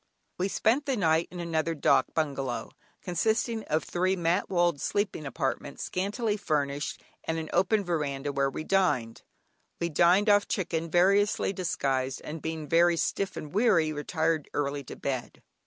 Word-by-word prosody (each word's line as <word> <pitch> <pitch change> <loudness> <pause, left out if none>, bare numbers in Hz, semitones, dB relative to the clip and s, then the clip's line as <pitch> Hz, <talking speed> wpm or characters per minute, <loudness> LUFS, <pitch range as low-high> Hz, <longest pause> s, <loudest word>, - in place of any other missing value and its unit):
We 185 - +1
spent 245 +8 +1
the 265 -3 +1
night 160 -3 +2
in 180 - -8
another 165 -1 -1
"dâk" 135 -3 +2
bungalow, 135 -7 -2 0.3
consisting 220 +5 0
of 155 +1 0
three 185 +2 0
mat 175 +1 0
walled 175 -5 +1
sleeping 200 -7 -1
apartments, 135 0 -3
scantily 205 +3 -1
furnished, 145 -7 -2 0.2
and 160 - -1
an 160 -1 -5
open 205 +3 +3
veranda 145 -5 -2
where 140 0 +1
we 145 - -5
dined. 155 -12 +1 0.6
We 170 - -1
dined 175 +6 +4
off 205 -1 +4
chicken 165 -4 -2
variously 195 +4 +3
disguised, 135 -8 -1
and 155 0 -6
being 160 -1 -4
very 170 +2 +4
stiff 195 +3 -1
and 150 +1 -7
weary, 180 -8 +3
retired 160 +1 -1
early 140 -1 -1
to - - -8
bed. 130 -3 -4
165 Hz, 155 wpm, -28 LUFS, 145-190 Hz, 0.6 s, dined